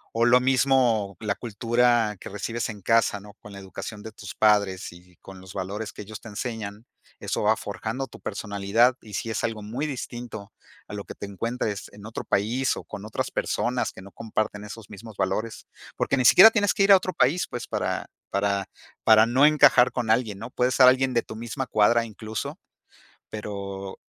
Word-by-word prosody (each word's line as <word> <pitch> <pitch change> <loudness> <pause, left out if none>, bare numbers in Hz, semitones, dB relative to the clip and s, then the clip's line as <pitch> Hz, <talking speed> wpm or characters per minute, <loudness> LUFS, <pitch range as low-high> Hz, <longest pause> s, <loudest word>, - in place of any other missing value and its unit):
o, 115 +1 +3
lo 120 +1 +6
mismo 125 -6 +2
la 105 -2 -1
cultura 120 -1 +1
que - - -8
recibes 115 +4 -3
en 105 -3 -8
casa, 115 -1 +2
¿no? 105 +1 -13
Con 105 - -12
la 100 - -10
educación 105 +2 -8
de 110 - -8
tus 100 -3 -10
padres 100 -3 +2
y 90 +1 -18
con 95 -1 -13
los 95 0 -12
valores 100 +3 -4
que - - -9
ellos 110 +1 -9
te 115 - -10
enseñan, 110 0 -5 0.3
eso - - -2
va - - +4
forjando 125 +5 -4
tu - - -14
personalidad, 105 +4 +1
y 105 - -13
sí 115 - -3
es - - -2
algo 110 -2 -2
muy 125 +9 -3
distinto 120 -6 -7 0.3
a - - -10
lo 100 -1 -5
que - - -9
te - - -7
encuentres 105 +1 -3
en 105 0 -12
otro 110 - -6
país, 120 +6 0
o, - - -7
con 100 - -9
otras 110 - -3
personas - - -1
que 95 - -12
no 100 - -13
comparten 110 -2 -3
esos 105 0 -10
mismos 105 0 -11
valores. 110 +4 -2 0.3
Porque - - +1
ni 125 - +1
siquiera 220 - +9
tienes 205 -3 +2
que 195 - +3
ir 200 - +5
a 195 - +10
otro 185 0 -4
país, 155 +4 +2
pues, 120 - -6
para - - -2 0.2
para 100 0 0 0.4
para 110 0 +7
no 130 +5 +4
encajar 145 -5 +5
con 120 -3 -3
alguien, 110 -4 +1
¿no? 115 +3 -8
Puedes 125 +1 +1
ser 130 -1 +7
alguien 130 0 +4
de 115 - +2
tu 110 - -9
misma 120 +4 -4
cuadra 115 +2 +3
incluso. 110 0 -6 0.7
Pero 100 -2 -6
110 Hz, 200 wpm, -25 LUFS, 100-120 Hz, 0.7 s, a